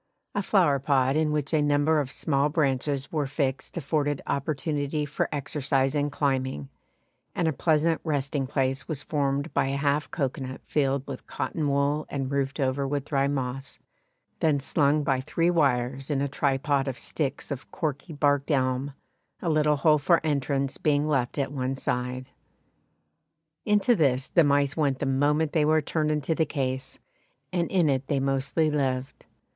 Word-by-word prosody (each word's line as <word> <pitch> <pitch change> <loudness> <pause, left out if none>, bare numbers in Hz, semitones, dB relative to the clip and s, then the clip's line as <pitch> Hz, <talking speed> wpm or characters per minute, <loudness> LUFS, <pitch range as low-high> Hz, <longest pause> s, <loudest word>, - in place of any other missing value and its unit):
A 205 - 0
flowerpot 140 -8 +2
in 155 -1 +2
which 150 0 -2
a 155 - +4
number 145 +2 +3
of 140 -3 -2
small 140 +1 0
branches 140 -2 0
were 150 -3 -1
fixed 140 +2 -2
afforded 145 -2 0
opportunity 145 +1 -1
for 145 - -2
exercise 135 -2 0
in 145 -1 0
climbing, 130 - -1 0.7
and 170 - +1
a 160 - +1
pleasant 160 +2 +2
resting 140 -3 -1
place 135 -1 -1
was 145 -3 -3
formed 140 +1 -1
by - - +2
a 135 +1 -1
half 145 +1 0
cocoanut 130 -3 -3
filled 140 -2 0
with - - -8
cotton 150 -3 -2
wool 140 +2 +1
and 135 -1 -3
roofed 140 +1 -1
over 135 0 0
with 140 0 -2
dry 140 -2 +1
moss, 135 -1 -3 0.6
then 150 -3 +2
slung 145 +1 +2
by 135 -2 +1
three 165 +6 +1
wires 135 -4 +1
in 145 -2 0
a 140 - 0
tripod 140 0 0
of 130 -2 -3
sticks 145 -1 -3
of 140 -2 -5
corky 150 -2 -4
barked 145 -1 +1
elm, 135 0 0 0.4
a 175 - -2
little 150 -1 +3
hole 150 +1 +4
for 170 +4 +4
entrance 140 -2 -1
being 150 0 +2
left 135 -5 0
at 140 -1 -1
one 135 -1 -2
side. 125 0 -3 1.4
Into 210 +3 +3
this 135 -6 +1
the 170 - +5
mice 145 -1 +2
went 145 -4 +1
the 140 - -2
moment 145 +3 +1
they 155 - +3
were 155 +1 +4
turned 155 0 -1
into 150 +1 0
the 160 0 +1
case, 130 -2 -3 0.6
and 170 -2 0
in 180 -4 +3
it 135 -1 0
they 140 - +1
mostly 135 +3 +1
lived. 130 -3 -2
140 Hz, 165 wpm, -26 LUFS, 135-150 Hz, 1.4 s, the